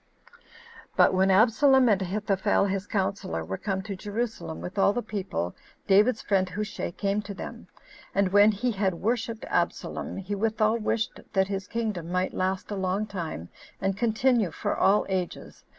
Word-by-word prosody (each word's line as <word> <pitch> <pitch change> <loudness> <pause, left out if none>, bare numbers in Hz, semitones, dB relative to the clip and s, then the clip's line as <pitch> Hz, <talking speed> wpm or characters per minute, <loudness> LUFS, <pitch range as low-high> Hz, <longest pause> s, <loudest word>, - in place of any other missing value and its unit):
5. - - -25 0.6
But - - +5
when 190 +1 +3
Absalom, 250 +6 +5
and 205 -3 +3
Ahithophel 195 +1 +1
his 195 0 -2
counselor, 190 - -2
were 95 - -3
come 190 -2 -2
to 200 -1 -5
Jerusalem, 210 -3 -4
with 195 +3 -5
all 200 - +4
the 245 - -2
people, 190 - -3 0.3
David's 210 +4 +4
friend, 190 -2 +1
Hushai, 210 +4 -4
came 200 +3 -1
to 200 -1 -8
them; - - -8 0.5
and 200 -1 +3
when 205 +1 +7
he 240 +4 -1
had 195 -4 0
worshipped 225 +3 -2
Absalom, - - -2
he 195 +1 -4
withal 220 +2 +1
wished 225 +1 -1
that 190 -1 +2
his 195 0 -3
kingdom 210 -8 -3
might 180 +1 0
last 190 +2 -2
a - - -1
long 190 +2 -1
time, 170 - -5 0.3
and 195 0 0
continue 230 -1 +2
for - - -2
all 200 +2 +3
ages. 185 -2 -4
200 Hz, 165 wpm, -27 LUFS, 190-215 Hz, 0.6 s, when